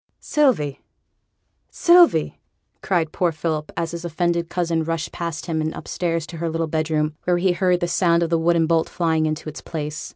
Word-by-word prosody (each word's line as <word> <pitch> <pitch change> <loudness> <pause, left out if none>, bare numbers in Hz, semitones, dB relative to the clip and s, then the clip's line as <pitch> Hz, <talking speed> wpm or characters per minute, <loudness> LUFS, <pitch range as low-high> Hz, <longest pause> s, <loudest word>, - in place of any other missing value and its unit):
'Sylvie, 245 - +1 0.9
Sylvie,' 350 0 +4 0.4
cried 170 -5 0
poor 175 -2 +1
Philip, 155 -1 -3
as 165 -1 -2
his 170 0 -6
offended 170 0 -1
cousin 170 -2 0
rushed 165 0 -3
past 165 -3 -5
him, 160 -2 -1
and 155 0 -2
upstairs 165 -2 -2
to 165 - -9
her 165 +1 -2
little 165 +1 -1
bedroom, 155 -1 -1
where 180 -1 +2
he 185 +1 +2
heard 180 0 +1
the 175 - 0
sound 170 -1 +2
of 165 - -2
the 165 - +3
wooden 165 0 +3
bolt 165 0 +1
flying 160 -2 +1
into 155 0 -4
its 155 - -7
place. 155 0 -5
165 Hz, 185 wpm, -22 LUFS, 160-175 Hz, 0.9 s, Sylvie